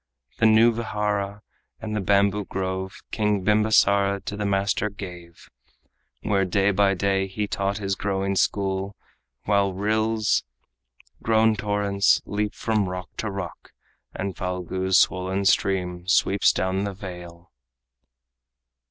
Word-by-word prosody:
The 110 - +5
new 110 +2 +6
vihara 105 -3 -3 0.4
and 110 -1 -5
the 105 - -1
bamboo 100 +1 +2
grove 95 0 -4
King 105 -3 0
Bimbasara 100 -2 +3
to 100 - -4
the 105 0 -2
master 100 +1 0
gave, 90 -4 -10 0.8
Where 100 -2 +1
day 95 +2 +2
by 100 0 +2
day 95 +1 0
he 105 +2 -3
taught 100 -1 -2
his 100 -2 -2
growing 100 0 -1
school, 95 0 0 0.5
While 100 -2 +1
rills, 110 +2 +1 0.8
grown 110 0 +3
torrents, 100 -1 +2
leap 105 0 -2
from 110 -4 0
rock 90 0 -6
to 110 - -2
rock, 95 -4 -7 0.4
And 95 -1 -4
Phalgu's 90 +1 -1
swollen 95 +2 +1
stream 90 -2 +1
sweeps 100 0 +3
down 95 +1 -1
the 100 -1 -4
vale. 90 -2 -10
100 Hz, 125 wpm, -24 LUFS, 95-105 Hz, 0.8 s, new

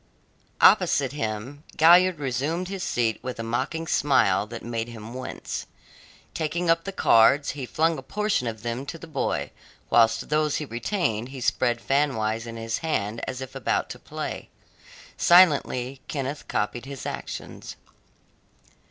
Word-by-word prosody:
Opposite 135 -3 +5
him 130 +1 -4
Galliard 175 +2 +6
resumed 145 +7 -2
his 195 -1 -5
seat 115 -8 0
with 125 -2 -6
a - - -2
mocking 120 +8 -2
smile 105 -10 +2
that 115 +1 -8
made 115 -1 -3
him 115 -1 -9
wince. 130 0 -6 0.7
Taking 165 +2 0
up 165 0 +1
the 195 - -3
cards, 140 -4 +4
he 135 -3 -6
flung 160 +1 +1
a - - -7
portion 210 - -1
of 110 -1 -5
them 120 +2 -3
to 165 - -5
the 165 - -10
boy, 155 -4 -2 0.4
whilst 115 -1 +3
those 150 0 +1
he 150 - -2
retained 120 - -2
he 135 0 -8
spread 120 -1 +1
fanwise 115 -5 0
in 115 0 -7
his 115 0 -3
hand 110 -8 -2
as 130 0 -5
if 130 - -7
about - - -1
to - - -8
play. - - -6 0.7
Silently 140 -7 +4
Kenneth 140 0 -4
copied 120 +4 -2
his 140 -1 -7
actions. - - -6
130 Hz, 150 wpm, -25 LUFS, 115-155 Hz, 0.7 s, Galliard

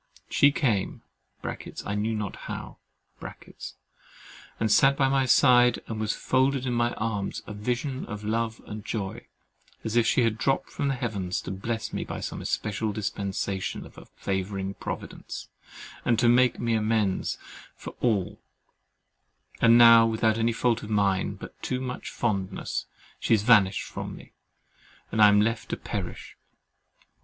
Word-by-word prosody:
She 145 - +5
came 115 -10 -1 0.8
(I 100 - -2
knew 110 +2 -1
not 105 -2 -3
how) - - -6 1.8
and 110 -1 +1
sat 135 +5 +5
by 135 - +3
my 135 -1 +2
side 125 -1 +5
and 110 -1 -5
was 110 0 0
folded 130 0 +1
in 125 - -1
my 120 0 +1
arms, 105 -3 -3
a 105 - -7
vision 125 +6 -3
of 105 -1 -6
love 115 +1 -2
and 105 0 -7
joy, 100 -4 -4 0.6
as 110 0 -3
if 120 -1 +4
she 125 - +3
had 115 -1 0
dropped 135 +2 0
from 145 - -2
the 135 - +1
Heavens 100 -7 -2
to - - -6
bless 110 +3 -4
me - - -2
by - - -6
some - - -5
especial 110 0 -2
dispensation 100 -1 -3
of - - -15
a - - -12
favouring 95 0 -3
Providence, - - -7 0.5
and 120 0 +4
make 125 0 +3
me 115 -1 0
amends 110 -3 0 0.4
for - - -8
all; 105 -7 0 1.2
and 115 0 +7
now 115 -1 +8
without 110 0 +1
any 115 +1 +2
fault 115 0 +1
of 105 - -8
mine 100 -3 +1
but - - -11
too 125 - -2
much 130 -1 -5
fondness, 100 -4 -2 0.3
she 115 - +3
has 105 - -1
vanished 105 -5 +5
from - - -6
me, - - -14 0.8
and 110 - +1
I 105 - +10
am 105 0 +5
left 115 +1 -1
to - - -2
perish. - - -6
110 Hz, 155 wpm, -27 LUFS, 105-120 Hz, 1.8 s, I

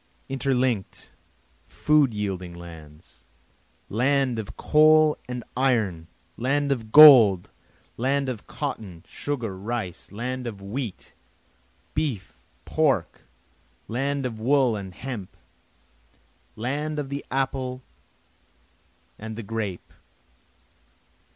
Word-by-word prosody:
Interlink'd, 130 -6 -1 0.6
food 150 -4 +2
yielding 95 -4 -4
lands! 80 -2 -13 0.6
Land 130 +1 +1
of 105 - -7
coal 155 0 +5
and 125 -1 -4
iron! 110 -11 0 0.3
land 140 +4 0
of 115 -5 -3
gold! 120 - +9 0.5
land 135 +3 0
of 120 -5 -5
cotton, 90 -6 -6
sugar, 120 -9 -4
rice! 100 -3 -5
Land 125 +4 -4
of 105 -4 -6
wheat, 105 +2 -6 0.8
beef, 130 -11 -3 0.3
pork! - - 0 0.7
land 135 +3 -2
of 115 -3 -4
wool 130 0 +3
and 95 -3 -7
hemp! 115 -6 -7 1.2
land 145 +7 -3
of 145 -2 -3
the 140 +1 -4
apple 130 -1 -2 1.4
and 110 +1 -7
the 115 - -6
grape! 105 -4 -5
120 Hz, 95 wpm, -25 LUFS, 100-135 Hz, 1.4 s, gold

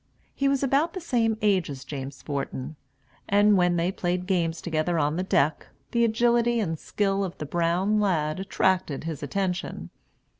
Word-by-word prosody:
He 275 - 0
was 275 0 +1
about 280 +5 +2
the 370 - -4
same 230 -9 +1
age 195 -6 +2
as 135 -2 -7
James 135 -2 -7
Forten; 140 0 -4 0.5
and 205 +1 +5
when 180 -2 +3
they 170 +2 +1
played 180 -1 -2
games 170 -3 0
together 170 +1 -1
on 150 0 +1
the 180 - -1
deck, 155 -5 +1 0.2
the 235 -1 +2
agility 235 +1 +2
and 165 -7 -2
skill 195 -1 0
of 185 -3 -5
the 150 - -5
brown 175 +7 +1
lad 160 -6 0
attracted 185 -6 0
his 160 -3 -5
attention. 180 +5 -3
180 Hz, 165 wpm, -26 LUFS, 160-210 Hz, 0.5 s, and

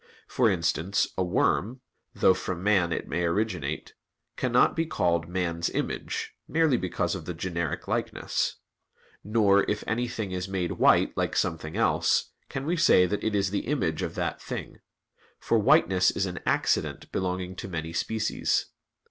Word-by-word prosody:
For 125 -3 +2
instance, 85 +1 0
a 95 - 0
worm, 110 +7 0 0.3
though 95 - +5
from 90 -1 -4
man 95 -5 +3
it - - -3
may 85 +2 -1
originate, 85 -4 -2 0.4
cannot 125 -1 +3
be 165 0 0
called 85 - 0
man's 85 -2 -1
image, - - -3
merely 160 -4 +3
because 90 -6 -1
of - - -6
the 90 - -5
generic 85 -2 -3
likeness. - - -1 0.7
Nor, 100 -2 +4
if 105 - -1
anything 115 -3 -2
is 90 0 -3
made 95 -3 -2
white - - +3
like - - -1
something 80 -2 -1
else, - - +2 0.2
can 135 0 -4
we 170 +3 0
say 125 - +5
that 100 +3 -2
it 110 -1 0
is 100 -1 +1
the 100 - -2
image 95 - 0
of - - -3
that - - -2
thing; - - -6 0.6
for 115 - +1
whiteness 105 - +4
is 100 - -1
an 90 -2 -5
accident - - 0
belonging 90 0 -2
to - - -5
many 80 -2 -5
species. 110 +4 0
95 Hz, 155 wpm, -27 LUFS, 85-110 Hz, 0.7 s, though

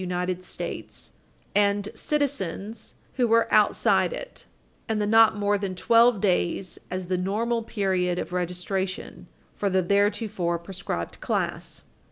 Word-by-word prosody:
United 180 0 -2
States, - - -6
supra, 205 - -4
and 205 0 +1
citizens 225 - -2 0.2
who 245 -2 +3
were 230 0 +4
outside - - +3
it, - - -8 0.4
and 220 -1 0
the 210 - +1
not 225 +1 +6
more 205 0 +1
than 195 -2 -3
12 230 +3 +4
days 185 -1 0
as 185 0 -3
the 185 +1 -1
normal 225 +5 0
period 190 -5 0
of 180 - -4
registration 180 +2 -3 0.3
for 200 - -1
the 190 -1 +2
theretofore 200 -2 +1
proscribed 170 - -5
class. - - -3
200 Hz, 135 wpm, -26 LUFS, 180-220 Hz, 0.4 s, not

